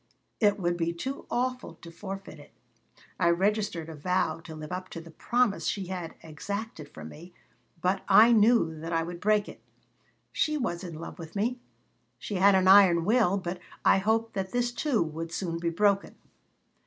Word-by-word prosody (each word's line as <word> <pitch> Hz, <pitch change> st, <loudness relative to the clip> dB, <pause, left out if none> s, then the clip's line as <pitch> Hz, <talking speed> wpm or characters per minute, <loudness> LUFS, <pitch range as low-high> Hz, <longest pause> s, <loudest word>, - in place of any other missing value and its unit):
It 205 Hz, -2 st, +3 dB
would 175 Hz, -1 st, 0 dB
be 170 Hz, 0 st, -1 dB
too 265 Hz, +11 st, -6 dB
awful 250 Hz, +1 st, -2 dB
to 170 Hz, -, -13 dB
forfeit 195 Hz, -2 st, -8 dB
it." 145 Hz, -, -15 dB, 0.7 s
I 170 Hz, -, +3 dB
registered 195 Hz, -1 st, 0 dB
a 165 Hz, -, -7 dB
vow 160 Hz, +1 st, -1 dB
to 165 Hz, -1 st, -10 dB
live 155 Hz, +2 st, -8 dB
up 185 Hz, +1 st, -5 dB
to -, -, -7 dB
the 165 Hz, 0 st, -12 dB
promise 240 Hz, +4 st, 0 dB
she 195 Hz, -2 st, -2 dB
had 175 Hz, -3 st, -6 dB
exacted 165 Hz, 0 st, -6 dB
from 80 Hz, 0 st, -10 dB
me, 175 Hz, -, -13 dB, 0.5 s
but 190 Hz, +2 st, +1 dB
I 220 Hz, +4 st, +7 dB
knew 220 Hz, -7 st, +4 dB
that 165 Hz, +2 st, -6 dB
I 165 Hz, 0 st, +1 dB
would 170 Hz, +1 st, -7 dB
break 210 Hz, 0 st, +2 dB
it -, -, -11 dB, 0.7 s
She 305 Hz, -1 st, 0 dB
was 175 Hz, -10 st, -3 dB
in 170 Hz, -3 st, -7 dB
love 165 Hz, +3 st, -9 dB
with 165 Hz, +1 st, -10 dB
me. 240 Hz, +5 st, -1 dB, 0.6 s
She 205 Hz, -, -5 dB
had 195 Hz, +1 st, +5 dB
an 190 Hz, 0 st, +3 dB
iron 190 Hz, -4 st, +7 dB
will, 210 Hz, -4 st, +3 dB
but 180 Hz, -1 st, -4 dB, 0.3 s
I -, -, +5 dB
hoped 225 Hz, +3 st, 0 dB
that 190 Hz, -1 st, -3 dB
this, 245 Hz, 0 st, 0 dB
too, 245 Hz, -, 0 dB
would 165 Hz, +1 st, -6 dB
soon 165 Hz, -1 st, -3 dB
be 170 Hz, 0 st, -1 dB
broken. 200 Hz, +3 st, +1 dB
185 Hz, 185 wpm, -28 LUFS, 165-210 Hz, 0.7 s, I